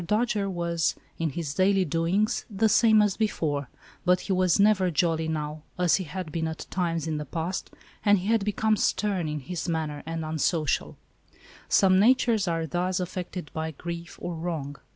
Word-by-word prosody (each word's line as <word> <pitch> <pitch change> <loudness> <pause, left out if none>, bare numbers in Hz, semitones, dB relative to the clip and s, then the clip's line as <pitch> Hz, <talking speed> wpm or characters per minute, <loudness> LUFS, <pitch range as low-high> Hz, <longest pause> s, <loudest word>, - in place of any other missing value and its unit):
Dojere 210 +1 0
was, 170 -2 0 0.2
in 165 -1 0
his 150 0 -4
daily 190 +2 +3
doings, 180 +8 +1
the 215 +1 +2
same 220 -1 +5
as 205 -2 0
before, 150 - -1 0.3
but 180 0 +3
he 195 - -1
was 185 0 +3
never 200 -3 +4
jolly 160 -1 +1
now, 155 -1 -3 0.2
as 180 -2 +3
he 190 - -4
had 165 +1 -6
been 160 +1 -1
at 160 0 -6
times 170 -3 -1
in 160 -1 -2
the 150 - -4
past, 165 +6 -3 0.3
and 205 0 +5
he 180 - -5
had 225 -2 +2
become 215 +1 +1
stern 195 -4 0
in 150 -1 -3
his 175 +5 -4
manner 155 -3 -2
and 165 -1 -3
unsocial. 155 0 0 0.7
Some 185 -1 +5
natures 230 -2 +3
are 165 -1 0
thus 180 +4 -1
affected 180 -3 -5
by 160 0 -2
grief 170 +2 -7
or 175 - -4
wrong. 160 -4 -4
175 Hz, 175 wpm, -27 LUFS, 160-195 Hz, 0.7 s, same